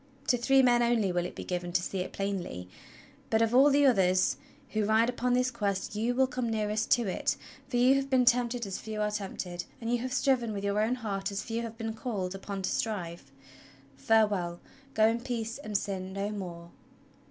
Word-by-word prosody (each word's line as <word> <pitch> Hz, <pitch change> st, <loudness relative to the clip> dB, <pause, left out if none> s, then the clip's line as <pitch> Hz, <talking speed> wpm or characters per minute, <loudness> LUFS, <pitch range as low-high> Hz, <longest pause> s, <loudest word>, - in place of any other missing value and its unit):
To -, -, +5 dB
three 265 Hz, +3 st, +4 dB
men 240 Hz, -1 st, +4 dB
only 235 Hz, -5 st, +2 dB
will 175 Hz, 0 st, 0 dB
it -, -, -12 dB
be -, -, -6 dB
given 175 Hz, -1 st, -3 dB
to 180 Hz, -, +2 dB
see 190 Hz, -, -3 dB
it 180 Hz, -, -3 dB
plainly; 190 Hz, -, -4 dB, 0.6 s
but 220 Hz, 0 st, +3 dB
of 225 Hz, +1 st, 0 dB
all 270 Hz, +3 st, +7 dB
the 285 Hz, 0 st, +4 dB
others 185 Hz, -7 st, +3 dB, 0.3 s
who 215 Hz, 0 st, 0 dB
ride 220 Hz, +3 st, +3 dB
upon 250 Hz, 0 st, 0 dB
this 250 Hz, 0 st, +1 dB
Quest 200 Hz, -5 st, -2 dB
you 230 Hz, +3 st, 0 dB
will 265 Hz, +1 st, +4 dB
come 255 Hz, -3 st, -3 dB
nearest 215 Hz, 0 st, -1 dB
to 240 Hz, -, +2 dB
it, 190 Hz, -, -1 dB, 0.3 s
for 245 Hz, -, -1 dB
you 250 Hz, +2 st, +6 dB
have 275 Hz, 0 st, 0 dB
been 255 Hz, -2 st, +3 dB
tempted 240 Hz, -1 st, +2 dB
as 195 Hz, -1 st, -4 dB
few 220 Hz, -1 st, -6 dB
are 210 Hz, 0 st, 0 dB
tempted, 190 Hz, -4 st, -4 dB
and 230 Hz, 0 st, -3 dB
you 240 Hz, -, +2 dB
have 255 Hz, +2 st, -4 dB
striven 250 Hz, -4 st, +1 dB
with 200 Hz, -1 st, -4 dB
your 200 Hz, +1 st, +1 dB
own 225 Hz, +4 st, +1 dB
heart 200 Hz, -5 st, -3 dB
as 200 Hz, -, -3 dB
few 230 Hz, 0 st, -3 dB
have 230 Hz, -1 st, -6 dB
been 225 Hz, -1 st, -3 dB
called 210 Hz, -6 st, -3 dB
upon 195 Hz, 0 st, -6 dB
to -, -, 0 dB
strive. 170 Hz, -10 st, -3 dB, 0.6 s
Farewell, 195 Hz, 0 st, +2 dB, 0.4 s
go 220 Hz, 0 st, +5 dB
in 230 Hz, +1 st, 0 dB
peace 235 Hz, -1 st, -4 dB
and 215 Hz, -7 st, -1 dB
sin 190 Hz, -2 st, -4 dB
no 200 Hz, +1 st, -2 dB
more!" 175 Hz, -4 st, -7 dB
220 Hz, 210 wpm, -29 LUFS, 195-240 Hz, 0.6 s, all